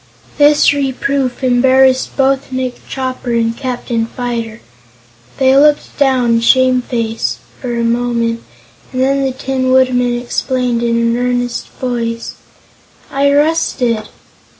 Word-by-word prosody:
This 295 0 +5
reproof 275 -1 -2
embarrassed 260 +1 +3
both 270 0 +1
Nick 255 -1 -3
Chopper 255 -2 -3
and 230 0 0
Captain 245 -3 -3
Fyter. 230 -2 -4 0.8
They 265 0 +3
looked 295 +1 +3
down, 250 -4 +3
shamefaced, 245 -2 +1 0.2
for 245 -2 -3
a 235 - -1
moment, 235 -1 0 0.5
and 255 - -4
then 275 +1 +1
the 265 - 0
Tin 260 0 -2
Woodman 250 -2 +2
explained 245 0 -1
in 235 0 0
an 235 0 +1
earnest 245 -1 -2
voice: 230 -2 -3 0.8
"I 280 +1 +2
rusted." 280 -7 +1
250 Hz, 115 wpm, -15 LUFS, 235-265 Hz, 0.8 s, This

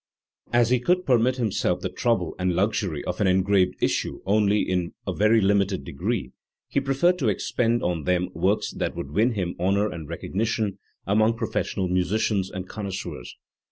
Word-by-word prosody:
As 120 0 +3
he 125 - +4
could 180 +9 +1
permit 125 0 +3
himself 105 -7 0
the - - -2
trouble 110 -9 0
and 90 -1 0
luxury 95 -6 0
of 90 +3 -3
an 100 - +3
engraved 95 0 +3
issue - - -1
only 105 +1 +3
in 90 -2 -2
a - - -2
very 110 +2 +4
limited 100 -1 +2
degree, 85 - -3 0.4
he - - 0
preferred 140 +7 +2
to 130 - 0
expend 115 +3 0
them 90 +1 0
on 90 - -5
works 95 +6 0
that - - -3
would 70 - -6
win 110 +9 +2
him 90 -4 -2
honour 100 +4 +1
and 80 -3 -8
recognition 105 +3 -2 0.3
among 110 +3 +2
professional 95 -4 -2
musi 90 +2 0
cians 100 -4 0
and 95 -1 -6
connoisseurs. 100 -2 -6
100 Hz, 170 wpm, -25 LUFS, 90-115 Hz, 0.4 s, he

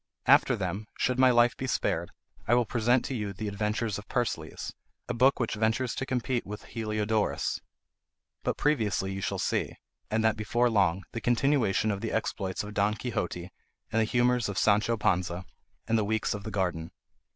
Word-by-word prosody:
After - - +5
them, 95 +4 -3
should 125 0 0
my 130 0 +7
life 120 -1 +4
be 130 - -4
spared, - - 0 0.4
I 120 - +5
will 120 -1 +3
present 120 +2 +2
to - - -3
you 105 -5 -3
the 105 +3 -5
Adventures 105 +1 -1
of 105 - -12
Persiles, 120 -2 -2 0.3
a - - -2
book 130 +4 +4
which 120 - 0
ventures 110 +3 0
to 135 - -4
compete 125 -1 -1
with 105 +1 -7
Heliodorus. 110 -1 -1 0.8
But - - -1
previously 105 - +1
you 95 - -4
shall - - -2
see, - - -1 0.3
and 110 +1 +1
that 110 -1 +3
before 120 +3 +1
long, 95 -3 +2
the 115 - -5
continuation 120 -4 +2
of 100 -1 -3
the - - -3
exploits 95 0 -2
of 105 0 -7
Don 105 +1 +2
Quixote 90 -6 -3 0.4
and 115 - +2
the - - +3
humours 120 0 +2
of 100 - -4
Sancho 105 +2 +3
Panza; 90 -5 +1
and 90 +1 -7 0.4
then 115 - +3
the 110 - +2
Weeks 110 +1 0
of 105 - -5
the - - -3
Garden. 90 -5 -1
110 Hz, 185 wpm, -29 LUFS, 100-120 Hz, 0.8 s, my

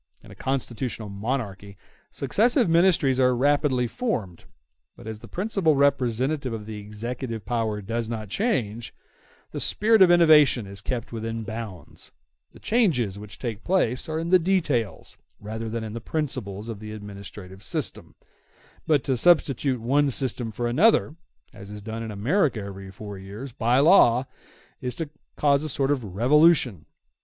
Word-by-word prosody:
In - - -14
a - - -12
constitutional 125 -4 -3
monarchy 100 -2 -4 0.3
successive 230 - +2
ministries 165 -6 +3
are 125 -1 +4
rapidly 140 -1 +2
formed; 115 - -3 0.5
but - - -14
as 110 -1 -6
the - - -12
principal 185 -5 0
representative 135 0 +1
of 110 -2 -6
the 110 -1 -7
executive 115 +2 -6
power 110 -4 -2
does 115 +2 -3
not 110 -2 -4
change, 115 - -2 0.6
the - - -4
spirit 220 0 +3
of 185 - +8
innovation 155 -9 +6
is 100 0 -8
kept 120 +1 -4
within 115 0 -4
bounds; 110 - -8 0.4
the - - -16
changes 135 - +1
which 105 -1 -9
take 115 -5 -5
place 160 -9 +1
are 160 - -2
in 165 +2 -3
the 185 - +7
details 150 - -1 0.2
rather 110 +2 -5
than 115 0 -3
in 110 -1 -6
the 115 - -6
principles 115 -8 -4
of 115 -3 -6
the 110 0 -8
administrative 100 -2 -10
system; - - -5 0.7
but 150 -4 +3
to 135 - 0
substitute 135 -3 +3
one 140 +5 +2
system 125 -3 -2
for 120 +2 -2
another, 155 - +3 0.4
as 100 -3 -11
is 105 0 -8
done 110 +1 -5
in 115 - -5
America 125 - +1
every 100 -1 -8
four 100 +1 -9
years, 105 +8 -8
by 120 +2 +1
law, 135 -5 +5 0.6
is 125 -1 -4
to 160 -3 -5 0.2
cause 140 -1 +3
a 155 - -3
sort 135 0 0
of 135 -4 0
revolution. 130 - +3
120 Hz, 155 wpm, -25 LUFS, 105-145 Hz, 0.7 s, of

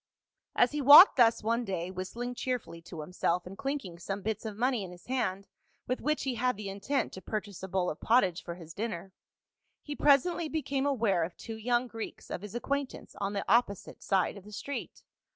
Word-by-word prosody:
As 245 - +4
he 295 0 -2
walked 290 +8 +10
thus 230 -3 +4
one 230 +2 +1
day, 185 -4 -3
whistHng 235 +7 -5
cheerfully 245 -10 -4
to 165 -1 -8
himself 175 +2 -1
and 185 +2 -8
clinking 270 -10 -4
some 195 +3 -5
bits 220 +1 -3
of 215 -2 -5
money 245 -2 +1
in 185 - -7
his 175 0 -13
hand, 200 -7 -2 0.4
with 255 - -2
which 305 0 0
he 265 -2 -1
had 250 -1 0
the 205 -2 -5
intent 200 +9 -2
to 190 - -8
purchase 205 -3 -5
a 190 - -5
bowl 185 -1 0
of 155 - -4
pottage 195 -7 +3
for 170 - -6
his 165 -2 -11
dinner, 195 -3 -5 0.7
he 295 - -5
presently 300 +4 +3
became 280 -3 -1
aware 220 -10 +2
of 170 +2 -6
two 225 - -7
young 240 +2 +1
Greeks 225 -2 -8
of - - -4
his 210 +2 -9
acquaintance 280 +2 -3
on 200 +1 -1
the 200 - -2
opposite 205 -2 +1
side 190 +1 +1
of 200 - -11
the 210 - -13
street. 280 +7 -6
220 Hz, 205 wpm, -30 LUFS, 190-255 Hz, 0.7 s, walked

